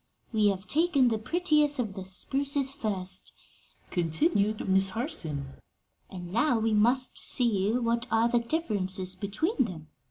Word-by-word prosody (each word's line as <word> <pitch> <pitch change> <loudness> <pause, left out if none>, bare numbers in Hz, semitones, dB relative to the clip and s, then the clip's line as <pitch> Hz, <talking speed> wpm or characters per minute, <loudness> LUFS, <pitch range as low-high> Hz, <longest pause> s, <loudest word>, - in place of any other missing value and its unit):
"We 215 -2 +3
have 195 -1 -1
taken 295 -4 +2
the 220 -2 -1
prettiest 300 +1 +1
of 225 -6 -2
the 190 - -7
spruces 275 +8 -1
first," 195 -8 -2 0.6
continued 200 - 0
Miss 190 0 +3
Harson, 160 - -5 0.6
"and 180 -2 -9
now 240 +2 +2
we 225 0 0
must 240 +5 +2
see 210 -5 +3
what 235 -1 0
are 225 +1 +3
the 240 0 +2
differences 200 - -2
between 260 - -1
them. 160 -7 -9
220 Hz, 135 wpm, -28 LUFS, 190-265 Hz, 0.6 s, We